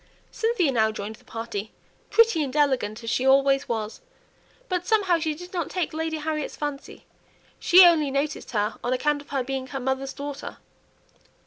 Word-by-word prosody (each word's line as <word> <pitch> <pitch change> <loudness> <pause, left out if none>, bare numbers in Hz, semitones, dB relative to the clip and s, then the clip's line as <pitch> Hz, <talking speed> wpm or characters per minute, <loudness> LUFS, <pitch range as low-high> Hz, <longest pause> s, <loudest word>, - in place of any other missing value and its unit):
Cynthia 445 - +1
now 220 -3 +2
joined 215 0 -6
the - - -23
party, 225 -2 -6 0.4
pretty 455 -8 +4
and 280 -2 -3
elegant 255 -7 +1
as 230 - -4
she 255 - 0
always 275 +1 +3
was; 220 - -3 0.7
but 360 -3 -2
somehow 390 -6 +3
she 315 -1 -1
did 355 +4 -11
not 345 -3 -2
take 360 -5 -2
Lady 320 0 -2
Harriet's 305 -1 -3
fancy; 290 -2 -6 0.5
she 360 +1 +8
only 320 -4 +4
noticed 280 +2 -2
her 210 -1 -1
on 245 - 0
account 290 +3 0
of 285 - -18
her 270 -2 -1
being 265 0 -4
her 270 0 -5
mother's 265 +1 -2
daughter. 285 0 -7
280 Hz, 175 wpm, -25 LUFS, 255-320 Hz, 0.7 s, she